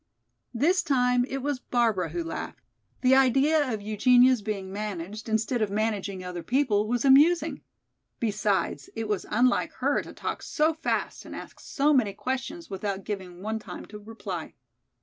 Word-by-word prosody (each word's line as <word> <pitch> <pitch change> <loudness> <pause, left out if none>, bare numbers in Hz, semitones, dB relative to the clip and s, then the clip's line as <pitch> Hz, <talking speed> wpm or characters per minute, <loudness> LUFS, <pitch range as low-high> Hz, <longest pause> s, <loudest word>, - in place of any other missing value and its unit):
This 350 +10 +3
time 250 -4 +2
it 270 0 -5
was 285 -2 -1
Barbara 225 -9 +1
who 170 +2 -3
laughed. 165 - -6 0.4
The 255 0 +5
idea 270 +2 +4
of 215 -2 -4
Eugenia's 245 +3 +4
being 200 -2 -4
managed 210 +1 -5
instead 225 +2 0
of 215 - +1
managing 200 -2 -2
other 180 -1 -5
people 225 -3 +1
was 245 +3 0
amusing. 300 +6 +5 0.6
Besides, 205 - -1
it 225 -1 -3
was 210 -2 -2
unlike 245 +3 +2
her - - 0
to - - -10
talk - - -4
so 310 +2 +1
fast 315 - -2
and - - -9
ask - - -10
so 295 +2 +1
many 225 -7 +2
questions 265 - -4
without 195 0 -4
giving 185 -3 -6
one 220 +1 -2
time - - -9
to 210 - -10
reply. 205 -6 -7
220 Hz, 160 wpm, -27 LUFS, 200-260 Hz, 0.6 s, The